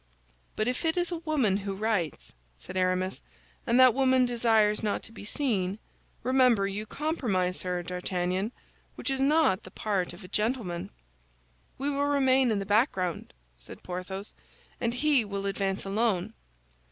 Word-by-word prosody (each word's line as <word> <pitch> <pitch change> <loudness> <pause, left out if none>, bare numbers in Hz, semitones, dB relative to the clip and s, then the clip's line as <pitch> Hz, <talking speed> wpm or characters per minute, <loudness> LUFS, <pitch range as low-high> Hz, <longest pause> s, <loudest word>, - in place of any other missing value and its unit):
"But 215 - 0
if 250 +5 -1
it 325 +1 +1
is 355 0 +1
a 345 - -2
woman 300 - +1
who 200 -1 -4
writes," 200 -6 -2 0.2
said - - -10
Aramis, 185 0 0 0.5
"and 240 +1 +4
that 255 -2 +8
woman 260 -1 +4
desires 225 -3 +2
not 210 -2 -1
to - - -7
be 225 - -10
seen, 205 -6 -1 0.5
remember, 250 -5 +4
you 205 +2 -4
compromise 205 - -1
her, 180 -1 -2
D'Artagnan; 180 +3 -2 0.4
which - - -2
is 265 0 -1
not 285 -9 +3
the - - -12
part 195 -2 -1
of 175 +3 -12
a - - -9
gentleman." 210 -4 -1 0.9
"We 280 +2 -1
will 285 0 0
remain 265 -2 +3
in 215 - +1
the 195 - -3
background," 200 - +1 0.3
said - - -11
Porthos, 185 +3 -5 0.5
"and 235 0 -1
he 285 -1 +3
will 200 -1 -4
advance 195 -1 -1
alone." 200 -2 0
215 Hz, 155 wpm, -28 LUFS, 185-255 Hz, 0.9 s, that